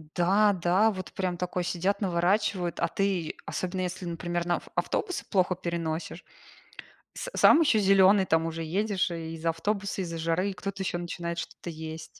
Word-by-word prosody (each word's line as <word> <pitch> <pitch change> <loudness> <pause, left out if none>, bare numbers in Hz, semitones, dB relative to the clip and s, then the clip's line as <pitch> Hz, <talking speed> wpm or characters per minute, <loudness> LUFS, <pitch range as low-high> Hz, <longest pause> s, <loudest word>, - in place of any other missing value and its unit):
Да-да, 195 +2 +3
вот 185 -2 -7
прям 180 -2 -2
такой 180 0 -2
сидят 185 +4 -1
наворачивают, 180 0 +1
а - - +2
ты, 190 -5 -1
особенно 185 0 -3
если, 180 0 -4
например, 175 0 -3
на 175 -1 +2
ав - - -12
автобусы 365 -4 -1
плохо 185 -2 +2
переносишь, 170 -2 -4 0.9
с - - -5
сам 325 - +7
еще 235 -9 +4
зеленый, 195 0 +5
там 160 -2 +2
уже 165 0 -4
едешь 195 +3 0
и 165 -1 -5
из-за 165 +1 -2
автобуса, 200 +4 -2
из-за 165 -2 -4
жары, 165 +4 0
и - - -6
кто-то 195 +1 -5
ещё 175 - -2
начинает 170 -1 -4
что-то 175 - -6
есть. 160 0 -7
180 Hz, 165 wpm, -28 LUFS, 170-195 Hz, 0.9 s, сам